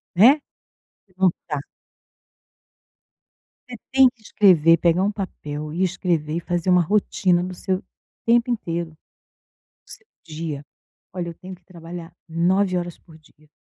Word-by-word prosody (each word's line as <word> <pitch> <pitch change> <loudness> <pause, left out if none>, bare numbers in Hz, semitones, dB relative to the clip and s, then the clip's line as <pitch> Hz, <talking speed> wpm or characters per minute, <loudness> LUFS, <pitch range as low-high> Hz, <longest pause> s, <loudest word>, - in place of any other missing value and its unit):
Né? 255 - +6 0.8
Levantar 170 -6 0 2.1
Você 245 - -7
tem 265 0 +6
que 240 -2 -28
escrever 170 -6 +5
pegar 170 +2 +2
um 205 - +1
papel 150 -7 -6
e 175 +4 -1
escrever 170 -4 -1
e - - 0
fazer 175 +1 -1
uma 180 0 +5
rotina 180 -1 +1
do 185 0 -5
seu 185 +1 -2 0.4
tempo 235 +1 +3
inteiro. 170 -8 -3 1.0
O - - -18
seu 460 - -13 0.2
dia. 155 -3 -6 0.5
"Olha, 175 -2 -3
eu 170 - -7
tenho 185 +2 -10
que 180 -1 -21
trabalhar 170 -1 -10 0.2
9 180 +3 +1
horas 175 -1 -4
por 160 -3 -18
dia. 155 -1 -24
175 Hz, 135 wpm, -22 LUFS, 165-190 Hz, 2.1 s, Né